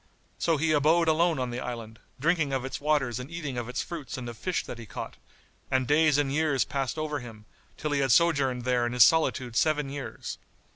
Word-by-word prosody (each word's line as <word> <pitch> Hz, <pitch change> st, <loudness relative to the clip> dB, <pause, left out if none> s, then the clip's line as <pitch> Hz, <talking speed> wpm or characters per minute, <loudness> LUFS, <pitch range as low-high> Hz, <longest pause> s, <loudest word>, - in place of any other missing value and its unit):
So 165 Hz, -2 st, +2 dB
he 155 Hz, +2 st, +1 dB
abode 155 Hz, +3 st, +3 dB
alone 165 Hz, +1 st, +3 dB
on 125 Hz, -2 st, -2 dB
the 120 Hz, -, -4 dB
island, 115 Hz, -3 st, -6 dB, 0.2 s
drinking 155 Hz, -1 st, +1 dB
of 130 Hz, -1 st, -1 dB
its 135 Hz, -, -5 dB
waters 140 Hz, -5 st, +1 dB
and 125 Hz, +3 st, -7 dB
eating 160 Hz, -6 st, -5 dB
of 120 Hz, -1 st, -4 dB
its 125 Hz, -, -2 dB
fruits 160 Hz, -7 st, -6 dB
and 125 Hz, -2 st, -6 dB
of 120 Hz, -, -6 dB
fish 180 Hz, +10 st, -2 dB
that 120 Hz, -, -7 dB
he 115 Hz, -, -9 dB
caught, -, -, -7 dB, 0.5 s
and 130 Hz, -1 st, +1 dB
days 150 Hz, +1 st, +4 dB
and 140 Hz, -2 st, +1 dB
years 150 Hz, -3 st, +2 dB
passed 135 Hz, +1 st, -2 dB
over 155 Hz, -1 st, -2 dB
him, 110 Hz, -4 st, -11 dB, 0.3 s
till 150 Hz, -, -3 dB
he 145 Hz, -, +1 dB
had 135 Hz, -2 st, +2 dB
sojourned 135 Hz, -5 st, +3 dB
there 125 Hz, -1 st, +1 dB
in 120 Hz, -, -4 dB
his 125 Hz, -2 st, +8 dB
solitude 130 Hz, -6 st, +2 dB
seven 150 Hz, -1 st, +2 dB
years. 145 Hz, -1 st, -6 dB
140 Hz, 220 wpm, -28 LUFS, 125-155 Hz, 0.5 s, his